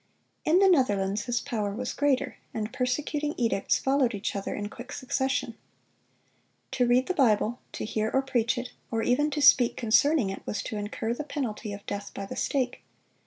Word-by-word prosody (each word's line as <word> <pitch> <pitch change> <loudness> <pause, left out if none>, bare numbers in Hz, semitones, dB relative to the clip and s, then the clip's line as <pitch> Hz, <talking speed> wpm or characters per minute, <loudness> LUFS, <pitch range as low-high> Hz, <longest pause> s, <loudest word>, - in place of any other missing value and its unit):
In 320 +3 +4
the 390 +1 +6
Netherlands 205 - +2
his 245 -1 0
power 205 -3 -2
was 250 +2 -3
greater, 285 -2 0 0.2
and 215 0 -3
persecuting 295 +4 -1
edicts 230 -5 +1
followed 265 -4 +1
each 200 +1 -3
other 200 - -3
in 205 0 -3
quick 245 +5 -10
succession. 265 -2 -1 1.2
To 255 -2 +2
read 250 +2 +4
the 370 - -1
Bible, 240 - +2
to - - -4
hear 215 0 -1
or 270 - +2
preach 245 -2 +1
it, 245 0 -4 0.2
or 225 -1 -1
even 290 +5 +2
to 295 -1 -1
speak 250 -3 +6
concerning 235 0 +3
it, 195 - -7
was 205 - -2
to - - -5
incur 210 +2 -3
the 270 - -4
penalty 240 -7 -4
of 200 0 -8
death 205 0 -5
by 195 - -4
the - - -7
stake. 255 -3 -1
245 Hz, 185 wpm, -28 LUFS, 215-270 Hz, 1.2 s, the